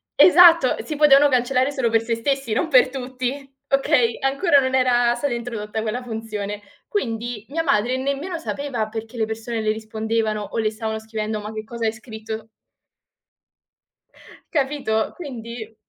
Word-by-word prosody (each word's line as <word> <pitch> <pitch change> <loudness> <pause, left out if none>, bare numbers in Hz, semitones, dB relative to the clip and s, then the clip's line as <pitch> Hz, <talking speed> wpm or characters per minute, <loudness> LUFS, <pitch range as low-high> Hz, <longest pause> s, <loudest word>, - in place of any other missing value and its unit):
esatto, 340 -6 +7
si 310 - -4
potevano 290 -1 +6
cancellare 255 +1 +2
solo 255 -4 0
per 225 0 +2
se 230 0 -1
stessi, 270 0 -1
non 330 - 0
per 255 -2 +5
tutti, 260 +1 -5
okay, 250 -4 +2
ancora 280 +2 +3
non 260 0 0
era 245 -2 +3
stata 250 +2 -2
introdotta 225 -2 -4
quella 225 +3 -3
funzione. 215 -3 -5 0.3
Quindi 235 - -3
mia 330 +3 -1
madre 250 -3 +1
nemmeno 280 +7 -3
sapeva 280 -8 -3
perché 225 +2 -7
le 220 - +1
persone 225 +1 -4
le 215 0 +1
rispondevano 220 0 -2
o 205 +1 -6
le 220 -1 +1
stavano 220 0 -4
scrivendo: 220 -1 -4
"Ma 210 +1 -6
che 215 0 -6
cosa 230 0 -4
hai 220 - +2
scritto?" 220 -1 -8 2.0
Capito, 270 -7 0
quindi 235 -7 -8
235 Hz, 150 wpm, -22 LUFS, 220-270 Hz, 2.0 s, esatto